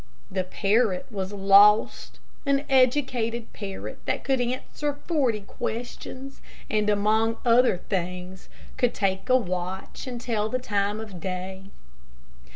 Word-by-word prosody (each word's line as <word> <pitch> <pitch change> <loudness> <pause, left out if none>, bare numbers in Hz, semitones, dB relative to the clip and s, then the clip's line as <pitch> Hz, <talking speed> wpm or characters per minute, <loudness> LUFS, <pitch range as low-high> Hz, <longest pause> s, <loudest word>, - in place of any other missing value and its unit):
The 190 -1 0
parrot 200 0 +1
was 195 -2 -3
lost 200 +1 +4 0.3
an 280 +1 +2
educated 250 -3 +2
parrot 195 -2 -6
that - - -1
could 265 -2 +1
answer 255 +4 -2
forty 265 -11 +1
questions, 245 +5 -6 0.3
and, 210 -1 +2
among 215 +2 +2
other 240 -4 +5
things, 180 0 -4 0.3
could 245 -2 +1
take 195 +2 -1
a 255 - +6
watch 185 +1 -4
and 245 -2 -5
tell 220 -3 -1
the 255 - 0
time 205 -4 -1
of 210 -5 -8
day. 190 +2 -5
215 Hz, 125 wpm, -26 LUFS, 195-245 Hz, 0.3 s, a